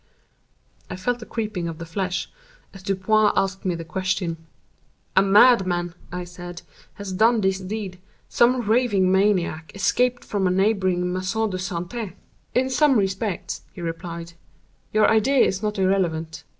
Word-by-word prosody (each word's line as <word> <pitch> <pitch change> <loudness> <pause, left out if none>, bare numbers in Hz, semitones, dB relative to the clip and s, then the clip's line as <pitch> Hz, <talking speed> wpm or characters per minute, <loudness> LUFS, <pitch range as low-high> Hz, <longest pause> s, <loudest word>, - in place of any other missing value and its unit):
I 185 - -4
felt 240 +6 -2
a - - -9
creeping 210 -6 -3
of 165 -1 -5
the 165 - -7
flesh 180 +1 -2 0.5
as 195 - -11
Dupin 200 +2 +2
asked 195 +1 -1
me 180 -2 0
the 165 0 -7
question. 175 -3 -2 0.7
"A 190 - +7
madman," 190 -4 +4 0.2
I 180 0 -4
said, 175 0 -9 0.3
"has 200 -2 -6
done 225 +4 +4
this 190 -1 +1
deed—some 205 +5 -1
raving 210 -5 +3
maniac, 185 -6 +1
escaped 245 +5 +1
from 195 -3 0
a - - +2
neighboring 185 -2 +1
Maison 195 +4 -1
de 185 - -2
Santé." 185 +3 -4 0.4
"In 260 +1 +3
some 270 0 +4
respects," 195 -1 -2
he 180 - -9
replied, 170 0 -6 0.6
"your 215 0 +4
idea 235 +5 +4
is 190 0 -1
not 210 0 -2
irrelevant. 175 -4 0
190 Hz, 145 wpm, -23 LUFS, 180-215 Hz, 0.7 s, A